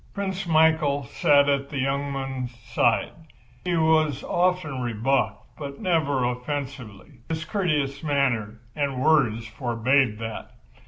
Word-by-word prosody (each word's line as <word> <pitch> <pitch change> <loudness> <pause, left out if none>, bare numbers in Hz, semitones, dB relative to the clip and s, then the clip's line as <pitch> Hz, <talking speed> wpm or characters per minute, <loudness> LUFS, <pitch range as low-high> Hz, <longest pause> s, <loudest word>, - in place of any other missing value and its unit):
Prince 195 -2 -3
Michael 160 -3 +3
sat 140 +2 +3
at 140 -1 0
the 145 - -5
young 140 +1 -1
man's 135 -3 -4
side. 120 0 +1 0.5
He 180 -2 0
was 155 -3 +2
often 175 -7 0
rebuffed 115 -2 0 0.2
but 140 -2 -7
never 155 - +1
offensively. 125 -2 -5
His 160 0 -3
courteous 150 -8 -1
manner 125 -7 0
and 140 -4 -1
words 130 -7 +3
forbade 120 +1 +1
that. 115 0 -7
140 Hz, 120 wpm, -25 LUFS, 125-155 Hz, 0.5 s, Michael